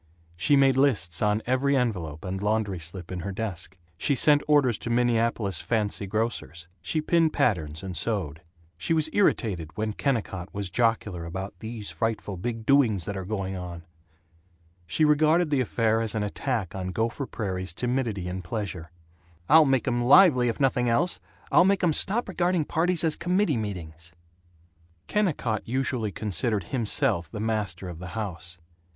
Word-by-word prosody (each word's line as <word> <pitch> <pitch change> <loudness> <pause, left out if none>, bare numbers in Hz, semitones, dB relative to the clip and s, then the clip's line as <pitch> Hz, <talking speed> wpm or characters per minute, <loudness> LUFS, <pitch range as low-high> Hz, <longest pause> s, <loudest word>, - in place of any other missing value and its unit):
She 100 +11 +3
made 135 -1 +4
lists 105 - +2
on 105 +1 +1
every 135 +3 +2
envelope 90 - -2
and 95 +1 -4
laundry 105 -3 0
slip 85 +2 -7
in 90 - -4
her 100 +3 -4
desk. 95 -3 -5 0.2
She 140 - +2
sent 145 +3 +5
orders 140 -7 +3
to - - -5
Minneapolis 115 -5 +1
"fancy 105 0 -1
grocers." 105 -5 -3
She 155 - -1
pinned 165 0 +2
patterns 80 -8 0
and 95 -2 -5
sewed. 85 -5 -2 0.4
She 130 - 0
was 155 0 +3
irritated 90 - 0
when 110 0 -1
Kennicott 105 -9 -2
was 100 -2 -4
jocular 105 -4 0
about 95 +4 -5
"these 110 -2 -6
frightful 110 -3 -2
big 115 +4 -4
doings 115 -10 +3
that 100 - -4
are 95 -1 -5
going 95 -2 -3
on." 90 -2 -7 1.0
She 120 - +2
regarded 155 +2 +3
the 140 -3 +2
affair 115 -2 +1
as 110 -1 -2
an 105 - 0
attack 105 -2 -2
on 95 -1 -4
Gopher 115 +8 -2
Prairie's 95 -4 -3
timidity 120 -2 -2
in 90 +1 -4
pleasure. 90 -2 -5 0.6
"I'll 160 0 +8
make 135 -3 +1
'em 120 0 +1
lively, 130 -2 +6
if 115 - -4
nothing 125 -3 +2
else. 170 +10 +1 0.3
I'll - - +6
make 195 0 +2
'em 170 -3 +3
stop 220 +10 +3
regarding 175 -3 0
parties 170 +2 +1
as 160 -2 +2
committee 180 -3 +1
meetings." 85 -6 -6 0.9
Kennicott 150 - -1
usually 125 -3 -1
considered 105 +1 -1
himself 105 - 0
the 105 - -7
master 105 -4 -2
of 85 -2 -8
the 90 - -7
house. 90 -4 -5
110 Hz, 160 wpm, -26 LUFS, 95-135 Hz, 1.0 s, I'll